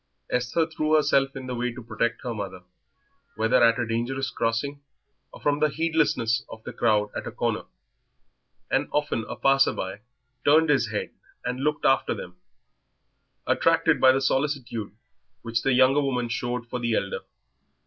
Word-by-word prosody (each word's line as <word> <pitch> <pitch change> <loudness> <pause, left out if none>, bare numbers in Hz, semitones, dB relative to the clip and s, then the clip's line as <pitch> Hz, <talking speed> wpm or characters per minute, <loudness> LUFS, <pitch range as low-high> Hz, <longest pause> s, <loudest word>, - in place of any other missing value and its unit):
Esther 125 +7 +1
threw 155 -1 0
herself 135 -3 +2
in 135 -1 -6
the 130 - -4
way 125 0 -1
to 120 +1 -9
protect 115 +1 -2
her 120 - -3
mother, 95 -4 -6 0.7
whether 110 +2 +3
at 115 0 +5
a 120 - 0
dangerous 120 +4 -2
crossing 125 +5 -2 0.5
or - - -12
from 145 0 +1
the 155 0 +3
heedlessness 150 -8 +1
of 110 - -10
the - - -7
crowd 105 -3 +1
at - - -4
a - - -4
corner, - - -2 1.1
and - - +1
often 145 -6 0
a - - -4
passer 135 0 +3
by 95 +2 -5 0.4
turned 155 +1 +5
his 130 -5 +2
head 105 - -3 0.3
and 125 +1 -2
looked 150 +2 -1
after 135 - +3
them, 90 0 -9 1.1
attracted - - +2
by 130 - +8
the 135 +1 +1
solicitude 130 -6 -1 0.5
which 115 0 -1
the 135 - +2
younger 130 +3 +5
woman 125 -3 -1
showed 120 +1 -3
for 125 - -4
the 115 -2 0
elder. 100 - -2
125 Hz, 165 wpm, -25 LUFS, 115-140 Hz, 1.1 s, by